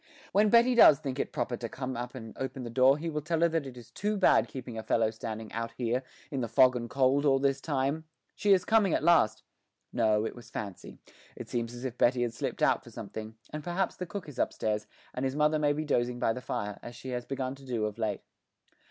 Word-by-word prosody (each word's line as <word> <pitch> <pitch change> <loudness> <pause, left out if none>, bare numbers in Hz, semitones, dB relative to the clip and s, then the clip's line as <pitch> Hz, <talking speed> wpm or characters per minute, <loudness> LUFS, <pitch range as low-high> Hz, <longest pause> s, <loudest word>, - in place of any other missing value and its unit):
When 210 +1 +4
Betty 235 +3 +5
does 230 -11 +8
think 135 -1 -3
proper 120 - -2
to 115 - -5
come 130 +1 -5
up 120 +1 -5
and 115 -3 -8
open 130 -1 -5
the 120 - -6
door 130 +3 +5
he 165 +2 -5
will 150 -2 -2
tell 160 +2 -1
her 170 - +5
that 160 -4 -1
it 125 -2 -10
is 120 - -13
too 210 +1 -1
bad 150 - +4
keeping 120 +1 -7
a 110 - -3
fellow 110 0 +1
standing 110 0 -6
out 115 0 -3
here, 125 +1 0 0.3
in 135 -3 -2
the 120 - -1
fog 130 +2 +5
and 120 -1 -4
cold, 135 +1 +2
all 135 -2 +4
this 135 0 +1
time.... 145 +2 -1 0.3
She 205 - +1
is 185 -2 +5
coming 215 -4 +3
at - - -1
last 155 -11 +4 0.5
no, 110 -2 +2
it - - -4
was 120 - -12
fancy; 100 -4 -7 0.4
it - - -8
seems 120 -1 -2
as 120 +2 -7
if 125 -2 -5
Betty 120 0 +3
had 120 -1 -2
slipped - - -3
out - - +3
for - - -13
something, 110 0 -7 0.2
and 150 0 -5
perhaps 175 +4 -1
the 180 - -5
cook 200 -1 -6
is 140 -4 -9
upstairs, 105 0 -1 0.3
and 125 - -3
his 135 0 -1
mother 150 +1 +3
may 145 -1 +3
be 155 +2 -2
dozing 120 -3 0
by 115 - +1
the 125 - -6
fire, 105 -5 -4
as 120 - -9
she 130 +2 -8
has 125 -1 -3
begun 130 0 -3
to 135 0 -14
do 120 -5 -2
of 105 +1 -5
late. 110 -3 -1
130 Hz, 245 wpm, -30 LUFS, 115-150 Hz, 0.5 s, does